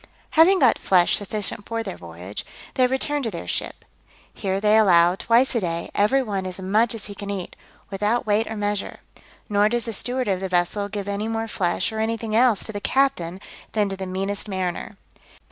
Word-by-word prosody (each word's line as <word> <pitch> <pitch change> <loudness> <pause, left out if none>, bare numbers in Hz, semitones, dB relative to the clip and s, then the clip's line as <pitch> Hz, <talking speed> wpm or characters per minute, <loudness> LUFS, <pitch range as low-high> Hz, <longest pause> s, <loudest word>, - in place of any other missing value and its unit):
Having 340 +5 +6
got 260 -9 +4
flesh 180 -2 +3
sufficient 205 0 -3
for 230 0 -2
their 190 -4 -5
voyage, 85 +4 -8 0.3
they 255 -1 +3
return 285 +3 0
to 235 - -1
their 170 - -7
ship: - - -4 0.5
here 195 -1 -2
they 210 +1 +4
allow, 175 -5 +6
twice 235 +7 +3
a 235 - +2
day, 170 -3 -3
every 240 +7 +3
one 195 -5 -3
as 185 0 -6
much 215 +5 +2
as 220 - -7
he 205 - -7
can 200 0 -7
eat, 195 -3 -4 0.4
without 210 +5 0
weight 215 +1 +2
or 220 - -5
measure; 205 -1 -2 0.5
nor 205 0 +3
does 240 +1 0
the 230 - -3
steward 250 +4 -2
of 190 -2 +1
the 190 0 -4
vessel 180 +3 0
give 205 -1 -5
any 205 +2 -2
more 225 0 -2
flesh, 185 -3 -1
or 220 - -4
anything 220 0 -1
else, 235 -3 +4
to - - -3
the 205 -1 -5
captain, 195 -12 +1 0.3
than 210 -2 +1
to 195 - -3
the 190 0 -5
meanest 195 +3 -2
mariner. 190 +1 -3
205 Hz, 200 wpm, -23 LUFS, 190-225 Hz, 0.5 s, Having